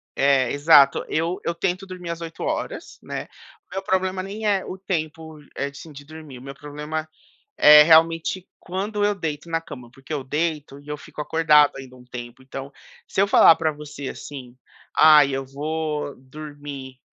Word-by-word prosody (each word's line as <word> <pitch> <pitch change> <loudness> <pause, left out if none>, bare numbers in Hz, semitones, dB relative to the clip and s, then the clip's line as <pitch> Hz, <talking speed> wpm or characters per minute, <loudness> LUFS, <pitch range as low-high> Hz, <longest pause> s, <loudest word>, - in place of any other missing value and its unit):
É, 135 -2 +3
exato. 145 -1 +5
Eu 165 +3 -1
eu 170 - -1
tento 180 +2 -2
dormir 180 -2 -8
as 170 0 -5
8 165 -1 -7
horas, - - -4
né. - - -6 0.4
Meu 190 +1 -3
problema 190 -1 0
nem 205 +3 -6
é 195 -2 +1
o 190 - -7
tempo, 160 -4 -5 0.2
eh, 140 - -2
assim, 140 +3 -11
de 145 0 -11
dormir. 155 -4 -11
O - - -14
meu 135 0 -9
problema 150 +2 -6 0.5
é 150 0 +9
realmente 165 +3 +3
quando 205 +3 -3
eu 205 0 +2
deito 160 -3 -5
na 165 - 0
cama, 125 -7 -11
porque 135 +3 -11
eu 145 -3 -2
deito 150 0 -3
e 145 - -19
eu 150 - -3
fico 150 - -11
acordado 150 -2 +4
ainda 130 -1 -10
um 125 - -16
tempo. 120 0 -9
Então, 135 +1 -8 0.4
se - - -1
eu 200 - +4
falar 165 - +7
pra 160 -1 0
você 145 -2 -8
assim: 125 -4 -9 0.4
"Ai, 150 -3 +7
eu 135 0 -3
vou 150 +1 -3
dormir 140 -1 -10
150 Hz, 180 wpm, -23 LUFS, 140-165 Hz, 0.5 s, é